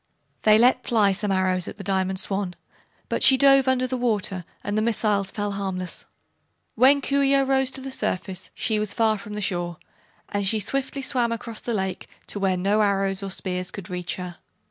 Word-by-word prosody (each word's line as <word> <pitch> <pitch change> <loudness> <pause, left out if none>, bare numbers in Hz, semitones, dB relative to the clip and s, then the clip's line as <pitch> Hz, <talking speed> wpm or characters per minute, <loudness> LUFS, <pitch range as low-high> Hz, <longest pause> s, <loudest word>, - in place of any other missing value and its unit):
They 215 0 +6
let 250 +2 +4
fly 215 -4 +3
some 205 +1 -1
arrows 185 -2 +1
at - - -8
the 200 - -8
Diamond 190 0 0
Swan, 195 -2 -2 0.5
but - - -2
she 265 - +7
dove 275 -1 +6
under 255 -1 +2
the 255 0 -2
water 205 -7 -1 0.2
and 205 - -3
the 215 - +2
missiles 210 -3 +1
fell 205 0 -3
harmless. 190 -2 -4 0.7
When 270 +4 +5
Coo 280 0 +1
ce 275 0 +4
oh 275 - +4
rose 265 -1 +2
to 265 +1 -2
the 270 0 -6
surface 185 -5 -3
she 220 -2 0
was 210 -2 -1
far 220 -2 +2
from 210 +1 -8
the 210 - -4
shore 175 -3 -2 0.5
and 205 0 -2
she 215 +3 +1
swiftly 275 +5 -2
swam 245 -3 +1
across 230 -1 -5
the 235 - -2
lake 190 -2 -3 0.2
to 205 - -3
where 190 -2 +1
no 200 +4 +2
arrows 195 -1 +1
or 195 - -4
spears 180 -1 -2
could 190 -3 -9
reach 180 -1 -3
her. 180 -2 -7
205 Hz, 205 wpm, -24 LUFS, 190-245 Hz, 0.7 s, she